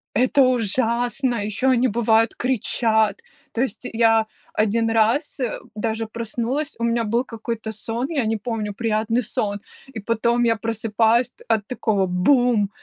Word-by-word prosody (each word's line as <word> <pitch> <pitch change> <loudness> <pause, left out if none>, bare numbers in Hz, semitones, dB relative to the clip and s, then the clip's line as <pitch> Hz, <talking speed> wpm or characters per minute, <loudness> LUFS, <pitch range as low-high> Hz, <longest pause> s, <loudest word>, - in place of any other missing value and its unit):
Это 255 +4 +3
ужасно! 245 +1 +1
Ещё 215 +5 0
они, 255 +1 +3
бывает, 225 0 +2
кричат! 220 -4 +1 0.3
То 235 - -2
есть 250 -1 -3
я 225 -1 +3 0.3
1 225 +2 +1
раз, 225 +8 +1
э, 245 -4 -2 0.2
даже 225 +1 -2
проснулась, 235 +7 -3
у 235 - -3
меня 235 0 +1
был 235 +3 0
какой-то 230 -2 -5
сон, 230 +4 -4
я 280 -8 0
не 220 0 0
помню, 215 -1 -4
приятный 225 +2 0
сон, 205 -1 -2 0.3
и 220 - -5
потом 235 +3 +1
я 230 -1 +3
просыпаюсь 225 +2 +1
т - - -19
от 220 -3 0
такого: 215 -6 0
"Бум!" 210 +3 +2
230 Hz, 150 wpm, -22 LUFS, 220-240 Hz, 0.3 s, Это